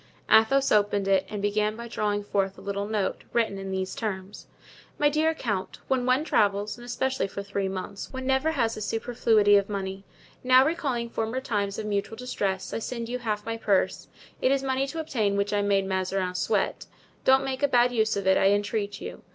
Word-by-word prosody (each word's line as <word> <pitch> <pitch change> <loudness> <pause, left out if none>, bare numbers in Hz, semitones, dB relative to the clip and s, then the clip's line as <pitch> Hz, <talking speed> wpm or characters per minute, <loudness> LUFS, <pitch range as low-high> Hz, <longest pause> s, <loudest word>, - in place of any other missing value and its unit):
Athos 265 +5 +5
opened 205 -1 +2
it 190 -1 +2
and 205 -1 -5
began 210 +1 +1
by 235 +1 -7
drawing 205 -2 -1
forth 195 -1 -1
a - - -11
little 200 0 -3
note, 210 -3 -2
written 225 -4 +1
in 195 0 -6
these 190 0 -2
terms: 195 -3 -5 0.5
"My 295 - +4
dear 315 +2 +2
Count,—When 245 +3 -2
one 255 +4 +3
travels, 205 -7 +1
and 240 - -13
especially 260 0 -1
for 200 0 -6
three 200 -1 -2
months, 190 +1 -6
one 260 0 -5
never 265 +4 +2
has 230 -6 0
a 215 - -7
superfluity 220 -2 +3
of 200 0 0
money. 195 -1 -4 0.4
Now, 255 +1 +6
recalling 265 -7 -1
former 225 +3 -2
times 205 -6 -2
of 220 - -4
mutual 210 +1 -2
distress, 200 -6 -3
I - - -1
send 235 0 -5
you 250 +1 -3
half 215 -3 -3
my 230 0 -3
purse; 205 -4 0 0.3
it 260 - +3
is 275 0 +1
money 265 0 0
to 325 +4 -5
obtain 220 -10 0
which 200 +1 0
I 205 - +2
made 200 -1 +2
Mazarin 190 -1 -1
sweat. 180 - -1 0.4
Don't 265 +1 +4
make 265 0 -3
a 285 - +4
bad 245 -2 +4
use 220 -3 +1
of 200 - -3
it, 190 0 +4
I 195 - +4
entreat 205 0 -1
you. - - -7
215 Hz, 200 wpm, -26 LUFS, 200-250 Hz, 0.5 s, Now